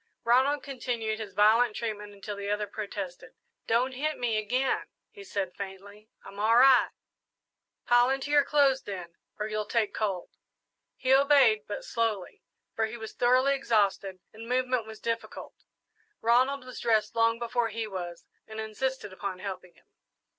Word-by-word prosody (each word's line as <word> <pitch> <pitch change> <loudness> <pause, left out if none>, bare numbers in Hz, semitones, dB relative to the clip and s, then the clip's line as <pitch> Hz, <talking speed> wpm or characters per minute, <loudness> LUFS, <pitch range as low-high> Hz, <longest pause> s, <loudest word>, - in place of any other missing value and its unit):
Ronald 265 +5 +3
continued 235 -5 -3
his 205 -3 -7
violent 215 +2 +4
treatment 210 -3 -4
until 205 +1 -7
the 200 0 -5
other 210 0 0
protested. 205 +1 -7 0.3
"Don't 240 +3 +2
hit 300 +4 -2
me 240 -3 0
again," 250 +5 0 0.2
he 415 -3 -12
said 195 - -4
faintly, 200 +2 -9 0.2
"I'm 200 - -10
all 220 +2 +3
right!" 260 +1 +6 1.0
"Pile 245 +1 +5
into 270 +2 -2
your 290 -1 +6
clothes, 280 -2 +3
then, 180 -4 -7 0.2
or 210 - -2
you'll 215 -1 -3
take 225 -2 0
cold." 195 -5 -2 0.6
He 260 +1 +2
obeyed, 270 -6 +5
but 205 - -5
slowly, 220 -5 -2 0.3
for 220 0 0
he 230 +2 -7
was 220 -1 -8
thoroughly 255 +3 +3
exhausted 205 -7 0 0.2
and 225 +2 -10
movement 255 -2 0
was 220 0 -10
difficult. 230 0 -4 0.7
Ronald 255 +4 +2
was 255 - -8
dressed 220 -3 +1
long 230 0 +3
before 235 0 -1
he 225 +1 -3
was, 175 -4 -6 0.2
and 220 0 -8
insisted 220 0 -3
upon 190 0 -5
helping 185 -2 -7
him. - - -26
225 Hz, 155 wpm, -28 LUFS, 205-255 Hz, 1.0 s, right